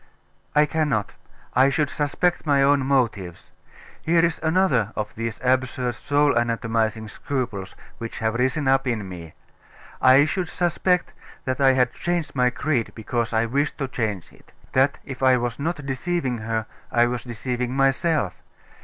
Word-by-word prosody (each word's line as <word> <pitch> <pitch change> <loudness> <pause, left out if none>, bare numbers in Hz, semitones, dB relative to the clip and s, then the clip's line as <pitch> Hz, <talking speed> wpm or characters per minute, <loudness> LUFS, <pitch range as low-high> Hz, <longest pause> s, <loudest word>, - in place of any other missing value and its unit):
'I 150 0 +6
cannot. 150 -8 -1 0.4
I 135 +2 +5
should 145 +1 0
suspect 175 +4 0
my 140 -2 +4
own 140 0 +4
motives. 115 -10 -1 0.5
Here 165 +1 +3
is 170 - -2
another 160 - +2
of 105 0 -4
these 115 0 -4
absurd 130 -1 +1
soul 145 +3 +2
anatomising 115 -2 0
scruples 110 -6 -4 0.2
which 115 -1 -6
have 110 -2 0
risen 130 +4 0
up 135 0 +3
in 110 -5 -1
me. 85 -3 -9 0.7
I 130 +2 +7
should 175 +2 -2
suspect 180 +1 0 0.3
that 130 +1 -2
I 135 -1 +6
had 125 -2 +2
changed 175 -2 -2
my 125 -2 +3
creed 125 -2 -1
because 115 +1 -2
I 110 0 +2
wished 140 +6 -1
to 135 - -2
change 110 - -3
it - - -21 0.2
that 135 +2 +3
if 135 -2 -8
I 130 -1 +5
was 120 0 -3
not 150 -1 -3
deceiving 135 -2 -2
her 110 0 -2 0.3
I 120 -1 +4
was 120 -1 -2
deceiving 125 +1 -3
myself. 135 - +1
130 Hz, 155 wpm, -23 LUFS, 115-145 Hz, 0.7 s, I